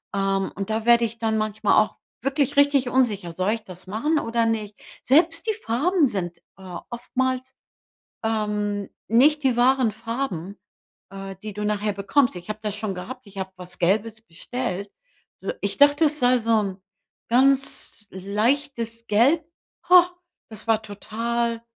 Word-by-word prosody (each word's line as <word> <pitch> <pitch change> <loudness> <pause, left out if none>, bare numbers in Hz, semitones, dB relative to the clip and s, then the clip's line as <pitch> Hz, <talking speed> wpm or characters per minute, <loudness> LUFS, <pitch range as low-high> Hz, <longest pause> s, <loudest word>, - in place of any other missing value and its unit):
ähm, 195 0 0
und 195 +1 -4
da 220 +1 -1
werde 235 0 +6
ich 230 +1 -6
dann 220 -1 0
manchmal 215 -1 +1
auch - - -10 0.2
wirklich 280 +2 0
richtig 285 -3 +4
unsicher: 215 -9 +1
„Soll 185 +5 0
ich 225 -1 -5
das 185 0 -12
machen 295 +11 0
oder 230 -2 0
nicht?” 215 -2 -2 0.3
Selbst 330 - +3
die 440 - +2
Farben 310 +9 +2
sind, 175 -6 -3 0.2
äh, 185 -2 -8
oftmals, 255 +2 -2 0.7
ähm, 210 -2 -1 0.2
nicht 290 +6 +4
die 260 -3 +3
wahren 255 -1 +4
Farben, 215 -5 -4 0.5
äh, 195 0 -7
die 215 -1 -6
du 210 +1 -4
nachher 210 0 0
bekommst. 205 +4 +2
Ich 175 +4 -11
habe 215 0 -4
das 210 -1 -2
schon 210 -2 -3
gehabt. 245 +6 -8
Ich 200 0 -14
habe 190 0 -4
was 180 0 -8
Gelbes 215 +5 +1
bestellt 200 +1 -5 0.5
äh, - - -3
ich 200 0 -2
dachte, 290 +2 +6
es 300 0 +1
sei 250 0 +4
so 230 0 -1
'n 195 -2 -4 0.5
ganz 265 -3 +2
leichtes 230 +4 -1
Gelb 275 +10 +3 0.4
Ha, 355 0 +8 0.4
das 220 0 -10
war 220 -1 +3
total 230 +3 -2
225 Hz, 155 wpm, -24 LUFS, 200-260 Hz, 0.7 s, Ha